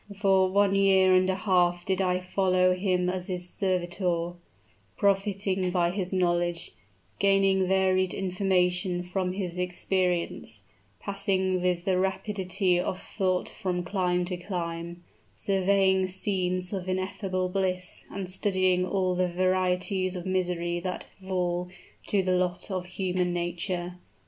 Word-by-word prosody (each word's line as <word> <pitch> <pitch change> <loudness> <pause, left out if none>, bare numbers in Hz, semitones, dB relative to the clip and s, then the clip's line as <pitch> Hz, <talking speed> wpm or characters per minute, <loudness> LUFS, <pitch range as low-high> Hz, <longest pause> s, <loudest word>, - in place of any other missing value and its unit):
"For 190 -2 +3
one 200 +1 +3
year 190 -1 +5
and 185 0 +4
a 190 - +1
half 180 -2 +2
did 190 0 0
I 180 -1 +1
follow 185 0 +2
him 180 -1 0
as 180 0 -2
his 180 -1 -3
servitor 175 -2 -1 0.6
profiting 195 -1 +1
by 175 -1 +1
his 185 -1 -2
knowledge 175 -2 0 0.5
gaining 195 -1 +3
varied 185 -1 +2
information 180 -1 0
from 180 0 -2
his 180 -2 -4
experience 180 - -1 0.4
passing 190 -2 0
with 180 -1 0
the 185 -2 +2
rapidity 190 -1 0
of 185 +1 -2
thought 185 -3 -1
from 180 -2 -3
clime 180 -1 0
to 180 0 -3
clime 170 -1 -5 0.3
surveying 190 - +2
scenes 185 -1 0
of 185 -1 -3
ineffable 185 0 -2
bliss, 185 -1 -2
and 195 -1 -5
studying 185 -1 +1
all 185 -1 0
the 180 0 +1
varieties 185 +1 0
of 180 0 -5
misery 175 -2 -1
that 180 +1 -4 0.2
fall 180 -1 -1 0.4
to 200 -2 +2
the 185 0 +1
lot 180 +1 -1
of 185 -1 -3
human 180 -1 -1
nature. 175 +1 -3
185 Hz, 130 wpm, -27 LUFS, 180-190 Hz, 0.6 s, year